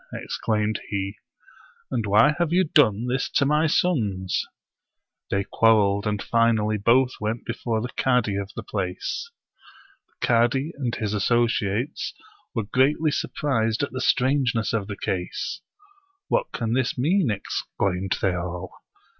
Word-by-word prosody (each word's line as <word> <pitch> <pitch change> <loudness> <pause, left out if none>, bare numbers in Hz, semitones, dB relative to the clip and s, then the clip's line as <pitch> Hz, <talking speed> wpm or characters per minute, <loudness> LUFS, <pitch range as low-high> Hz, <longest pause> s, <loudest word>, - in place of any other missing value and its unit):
" - - -17
exclaimed 105 -1 -1
he; 100 0 -2 0.4
" - - -28
and 115 -5 -1
why 110 +9 +5
have 170 -2 +1
you 185 +2 +4
done 120 - +3
this 125 +2 -1
to 140 - +2
my 150 +3 +3
sons?" 105 - 0 0.8
They 100 0 0
quarreled, 105 -2 +3
and 105 -1 -1
finally 110 -2 +2
both 125 +5 +4
went 110 +2 -2
before 115 -2 -2
the 125 - -4
cadi 125 -6 +2
of 100 0 -3
the - - -5
place. 100 - -3 0.8
The - - -5
cadi 120 +6 +2
and 125 -4 -2
his 105 -1 -2
associates 115 +2 0 0.4
were 115 - 0
greatly 140 +8 +2
surprised 115 -4 0
at - - -2
the 130 - -4
strangeness 125 -4 +2
of 105 -4 -1
the 100 -2 -6
case. 90 -2 -3 0.7
"What - - 0
can 115 -1 -2
this 130 +1 0
mean?" 160 +4 +2
exclaimed 95 -2 -2
they 95 -2 +3
all. 90 +1 -4
115 Hz, 145 wpm, -24 LUFS, 100-130 Hz, 0.8 s, why